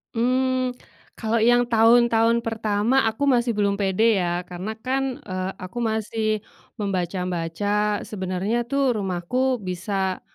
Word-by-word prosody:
Mmm, 255 +2 +1 0.5
kalau 225 0 0
yang 240 +1 +4
tahun-tahun 230 0 +4
pertama, 225 +3 +1
aku 220 +6 -2
masih 245 -3 +3
belum 200 -1 +2
pede 205 +3 +2
ya. 175 0 -2
Karena 180 +4 -5
kan, 265 +1 -2
eee, 185 -1 -4
aku 185 +5 -8
masih 220 -1 -1 0.4
membaca-baca, 190 +2 -1
sebenarnya 195 +4 -2
tuh 270 +1 +1
rumahku 210 +7 -1
bisa 190 0 -2
215 Hz, 115 wpm, -23 LUFS, 190-240 Hz, 0.5 s, yang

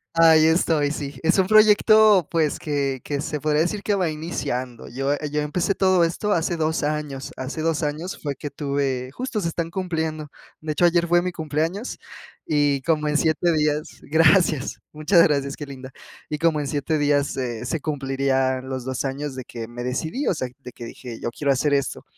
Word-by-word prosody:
Ahí 160 -1 +6
estoy, 160 -3 +2
sí. 140 -3 -5
Es 165 +4 +2
un 190 - +4
proyecto, 215 -2 +6
pues, 160 -3 +1
que 140 -3 -2
que 145 -1 -3
se 150 0 -3
podría 150 +1 +1
decir 200 +5 -1
que 210 - +1
va 185 -4 +1
iniciando. 130 -6 -4
Yo 135 +3 -1 0.2
yo 150 0 0
empecé 170 +6 -1
todo 185 -2 +3
esto 185 +5 -1
hace 170 0 0
2 160 0 0
años, 150 -2 -3
hace 130 +5 -4
2 165 0 0
años 155 +5 -3
fue 145 -2 -3
que 145 - -6
tuve, 140 -3 -2
justo 255 - -3
se 170 -4 -1
están 165 0 -3
cumpliendo. 160 -4 -3 0.3
De 155 0 -3
hecho, 165 +3 +2
ayer 170 0 +3
fue 175 +1 +4
mi 180 +1 -2
cumpleaños 165 - -3 0.5
y 145 -2 +1
como 155 +1 0
en 150 0 +1
7 160 +2 +2
días, 150 0 -1
gracias, 160 +2 +4 0.2
gracias, 145 -4 -4
muchas 155 +4 +4
gracias, 140 -3 +1
qué 145 - -7
linda, 130 -1 -9 0.4
y 150 - -4
como 165 -2 +2
en 145 - -2
7 150 +2 -1
días 145 -1 +2
se 120 -5 -4
se 165 - -1
cumplirían 135 -3 -1
los 130 -2 -4
2 130 +1 -3
años 140 +1 -4
de 130 - -6
que 115 -1 -7
me 120 +1 -7
decidí, 160 - -2
o - - +3
sea, 130 -6 -3
de 130 -3 -11
que 120 - -9
dije: 115 0 -9
"Yo - - -2
quiero 140 +4 -1
hacer 145 +2 +1
esto". 140 -1 -2
150 Hz, 200 wpm, -23 LUFS, 140-165 Hz, 0.5 s, Ahí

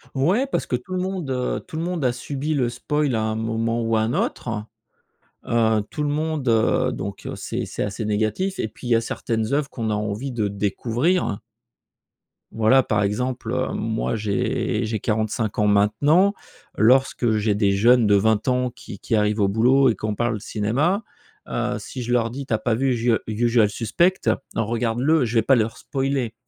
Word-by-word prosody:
Ouais, 180 - +2
parce 275 - -2
que - - -1
tout 125 +9 -6
le 185 - -1
monde, 185 -5 -3
heu, 125 -1 -1
tout 155 - -7
le 160 - -2
monde 175 -3 -2
a 125 - +3
subi 145 +4 -3
le 130 -5 +1
spoil 140 +3 -1
à 110 - 0
un 110 0 -1
moment 115 +1 -1
ou 115 0 0
à 110 - +2
un 110 +1 0
autre, 110 -3 -2 0.8
heu, 110 -2 +2
tout 150 - -4
le 145 - 0
monde, 155 -2 -2
heu, 110 -1 +2
donc, 100 +1 -6
heu, - - -4
c'est - - -4
c'est - - -3
assez 105 +2 -4
négatif 110 - -1
et - - -1
puis 110 - -10
il - - -3
y 120 - +5
a 115 - +3
certaines 115 +1 -2
œuvres 145 -1 0
qu'on 115 -3 -3
a - - +1
envie 105 +5 -3
de 110 -4 -1
découvrir. 115 - 0 1.1
Voilà, 115 +4 +4
par 105 -3 0
exemple, 115 +3 -2
heu, 130 0 -1
moi 110 +1 -2
j'ai 105 -2 -1
j'ai 110 0 -2
45 110 0 -1
ans 105 - +2
maintenant. 145 - +3 0.4
Lorsque 120 -1 +3
j'ai 105 -1 +1
des 100 -1 +2
jeunes 115 +4 +4
de 105 - +5
20 110 +1 +2
ans 125 0 +1
qui 100 - -11
qui 115 - -1
arrivent 105 0 +1
au 100 - +3
boulot 125 +7 +4
et 115 - +2
qu'on 105 +2 -3
parle 120 -1 -1
cinéma, 135 - 0 0.5
heu, - - -2
si 130 - -7
je 120 - -4
leur 120 -2 +2
dis: 135 +4 -6
«Tu 120 - -3
as - - +3
pas 115 0 0
vu 135 +3 +1
usu, 120 0 +1
heu, 110 - +1
Usual 115 0 +2
Suspect? 145 - +1 0.4
Regarde-le», 120 +7 +1
je 120 +1 -4
vais 115 - +5
pas 135 +5 +4
leur 110 -1 0
spoiler 135 -4 -2
115 Hz, 200 wpm, -23 LUFS, 110-135 Hz, 1.1 s, y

